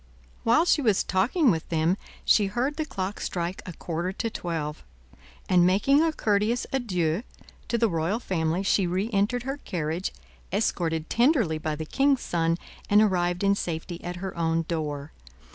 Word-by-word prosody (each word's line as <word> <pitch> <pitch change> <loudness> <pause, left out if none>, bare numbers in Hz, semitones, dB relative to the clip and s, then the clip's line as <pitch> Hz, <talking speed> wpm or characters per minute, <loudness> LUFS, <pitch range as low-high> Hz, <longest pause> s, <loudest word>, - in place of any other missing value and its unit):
While 235 +9 +4
she 315 - +3
was 215 -7 +3
talking 235 - +2
with 160 -3 -3
them, 165 +2 +2 0.3
she 205 -2 +4
heard 250 +8 -1
the 315 - -1
clock 195 -2 -4
strike 175 +1 -3
a 180 - -5
quarter 170 +3 -3
to 225 +4 -3
twelve, 155 - -4 0.6
and 180 -1 +5
making 205 - +4
a 325 0 +3
courteous 215 -2 +1
adieu 180 -9 0 0.5
to 235 - 0
the 230 0 +3
royal 170 +4 0
family, 170 -3 -1
she 195 -1 +2
reentered 205 +6 0
her 270 +2 -3
carriage, 170 - -3 0.4
escorted 165 -6 0
tenderly 235 - +2
by 155 0 -2
the 160 +1 -5
king's 275 - +2
son, 165 -1 0 0.3
and 205 - +6
arrived 180 -3 +2
in 200 0 +4
safety 170 -2 -4
at 175 0 -4
her 190 - -5
own 165 0 +1
door. 150 -3 -3
185 Hz, 160 wpm, -26 LUFS, 165-230 Hz, 0.6 s, and